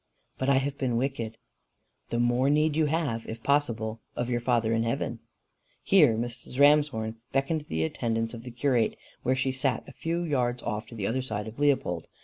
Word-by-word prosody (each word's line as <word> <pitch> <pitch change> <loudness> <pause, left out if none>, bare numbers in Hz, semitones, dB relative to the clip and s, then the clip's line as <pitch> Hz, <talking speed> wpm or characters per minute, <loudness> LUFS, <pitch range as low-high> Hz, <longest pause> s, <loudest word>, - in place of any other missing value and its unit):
"But 130 - +1
I 140 - +5
have 135 +1 0
been 125 -4 0
wicked." 120 -4 -2 0.7
"The 120 - -1
more 120 +3 +3
need 150 +1 +3
you 155 -1 +3
have, 145 -8 -1
if 115 0 -7
possible, 115 -6 0
of 120 +1 -2
your 120 - +1
Father 115 -2 +2
in 115 - +2
heaven." 115 0 -2 0.6
Here 150 - +5
Mrs. 120 +2 -5
Ramshorn 140 -7 +4 0.2
beckoned 145 +3 0
the 80 0 0
attendance 115 +6 -1
of 115 - -7
the 125 - -8
curate 125 -2 +1 0.3
where 130 +1 +1
she 135 0 0
sat 135 0 -1
a - - -9
few 170 +4 -2
yards 125 -6 0
off 110 0 -4
on 115 - -8
the 100 - -2
other 130 +6 0
side 110 -4 -3
of 110 +4 -9
Leopold. 135 - +1
125 Hz, 190 wpm, -28 LUFS, 115-140 Hz, 0.7 s, I